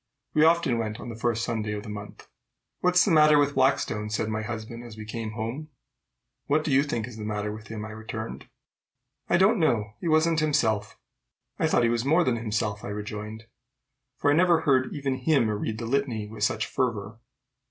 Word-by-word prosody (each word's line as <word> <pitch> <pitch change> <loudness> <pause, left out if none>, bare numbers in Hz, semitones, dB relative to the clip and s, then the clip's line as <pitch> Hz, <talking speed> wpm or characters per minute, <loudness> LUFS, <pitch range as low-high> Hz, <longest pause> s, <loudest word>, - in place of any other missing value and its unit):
We 155 - +4
often 160 -7 +3
went 110 -1 -3
on - - -7
the 115 - -6
first 115 0 -1
Sunday 110 -3 -2
of 105 -1 -5
the - - -9
month. 105 -1 -9 0.5
"What's 180 0 +4
the 200 - +1
matter 150 -1 +6
with 145 -1 +3
Blackstone?" 130 -5 +1
said 110 0 -1
my 110 0 -2
husband 115 +1 -6
as 115 -2 -11
we 110 - -7
came 110 0 -5
home. 120 +8 -5 0.8
"What 155 +2 +2
do 155 - -2
you 135 +1 +5
think 120 -6 -2
is 120 -3 -10
the 110 - -6
matter 105 0 -2
with 110 0 -9
him?" 110 -1 -6
I 110 - -8
returned. 110 +1 -7 0.8
"I - - +4
don't 200 +4 +4
know. 110 -10 +1
He 175 - -3
wasn't 160 +1 +3
himself." 115 -9 +1 0.6
"I - - +3
thought - - +3
he 115 - +3
was 120 0 0
more 160 +6 +4
than 125 -6 +1
himself," 110 -2 -2
I - - -5
rejoined; 105 +1 -6 0.7
"for 145 - +2
I - - +4
never 170 -1 +4
heard 130 -4 +2
even 140 -3 -2
him 145 -7 +2
read 105 +1 -2
the 115 - -5
litany 120 -4 -1
with 110 +1 -6
such 110 +1 +1
fervor." 110 -3 -2
115 Hz, 205 wpm, -26 LUFS, 110-145 Hz, 0.8 s, matter